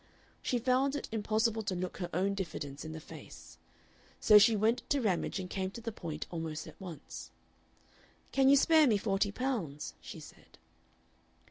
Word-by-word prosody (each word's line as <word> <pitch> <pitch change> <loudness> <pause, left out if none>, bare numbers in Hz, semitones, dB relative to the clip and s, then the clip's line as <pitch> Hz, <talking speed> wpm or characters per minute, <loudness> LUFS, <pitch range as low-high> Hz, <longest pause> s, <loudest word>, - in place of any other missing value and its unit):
She 250 - 0
found 260 +3 +2
it 290 - -4
impossible 220 +1 +1
to 200 -3 -2
look 180 0 -4
her 175 -2 -4
own 190 +4 +1
diffidence 155 -7 -5
in 155 - -6
the 160 - -6
face. 155 - -12 0.6
So 210 -1 +8
she 220 +2 +6
went 220 +3 +2
to 285 - +3
Ramage 195 -4 0
and 185 - -4
came 190 0 -2
to 195 - -9
the 230 0 -4
point 160 -7 -5
almost 160 -2 -4
at - - -13
once. 170 -6 -8 1.0
"Can 270 -1 +4
you 280 - +8
spare 310 +1 +6
me 220 -4 +4
forty 200 0 +1
pounds?" 200 - -3
she - - -8
said. - - -15
200 Hz, 170 wpm, -32 LUFS, 175-235 Hz, 1.0 s, So